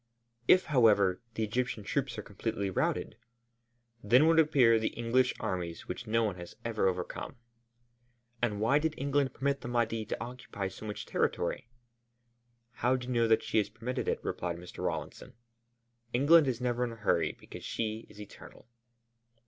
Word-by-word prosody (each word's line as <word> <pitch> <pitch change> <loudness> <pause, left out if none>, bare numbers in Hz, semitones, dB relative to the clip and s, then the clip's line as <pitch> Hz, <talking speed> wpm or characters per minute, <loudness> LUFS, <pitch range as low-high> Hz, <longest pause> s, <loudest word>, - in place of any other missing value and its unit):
"If, 185 - +6
however, 105 - +4
the 110 - -1
Egyptian 115 0 -2
troops 125 +3 -2
are 105 - -5
completely 100 0 -3
routed?" - - -1 0.9
"Then 125 +8 +5
would 165 0 +5
appear 130 -8 +5
the 110 - 0
English 120 +2 +2
armies 90 -5 -4
which 115 +6 -6
no 115 +1 +2
one 100 -4 -1
has 85 -1 -9
ever 110 -4 +1
overcome." 90 -1 -3 1.1
"And 105 -4 0
why 115 +7 +3
did 155 0 -1
England 140 -1 +1
permit 140 +1 -1
the - - -6
Mahdi 115 -2 0
to - - -4
occupy 120 -5 -5
so 110 +3 -9
much 105 - -5
territory?" 115 - -1 1.0
"How 125 +2 +1
do 125 -1 -4
you 125 - -3
know 115 -1 +3
that 110 0 +3
she 110 - +1
has 100 -1 0
permitted 115 +4 -4
it?" - - 0
replied 85 -1 -3
Mr. 90 +1 -9
Rawlinson. - - -4 0.8
"England 145 +5 +6
is 125 -3 -1
never 125 -1 0
in 120 -2 -2
a - - -9
hurry 105 -6 +1
because - - -11
she 110 0 -3
is 105 - -15
eternal." 105 +1 -12
115 Hz, 165 wpm, -31 LUFS, 105-125 Hz, 1.1 s, If